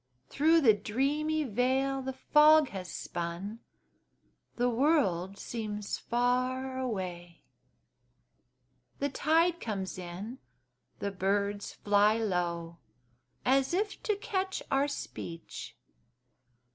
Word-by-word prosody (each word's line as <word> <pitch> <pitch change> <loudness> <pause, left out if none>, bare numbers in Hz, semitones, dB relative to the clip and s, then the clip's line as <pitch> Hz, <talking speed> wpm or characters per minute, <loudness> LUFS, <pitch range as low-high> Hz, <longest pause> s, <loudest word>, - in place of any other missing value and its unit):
Through 320 +3 +4
the 230 -7 +7
dreamy 280 +9 0
veil 265 +3 +1
the 265 0 -4
fog 300 +1 +5
has 185 -2 -6
spun 175 +6 -5 1.0
The 245 +1 +1
world 230 - +2
seems 210 -3 -4
far 255 +2 0
away; 180 -8 -4 1.5
The 285 - -1
tide 330 +5 +2
comes 195 - -4
in 185 +8 -7 0.6
the 200 - -3
birds 200 +2 -1
fly 205 +1 +3
low, 170 -5 -2 0.7
As 270 +5 +3
if 410 +2 -1
to 425 - 0
catch 385 -2 -2
our 275 +1 +3
speech. 170 - -7
240 Hz, 95 wpm, -30 LUFS, 195-280 Hz, 1.5 s, the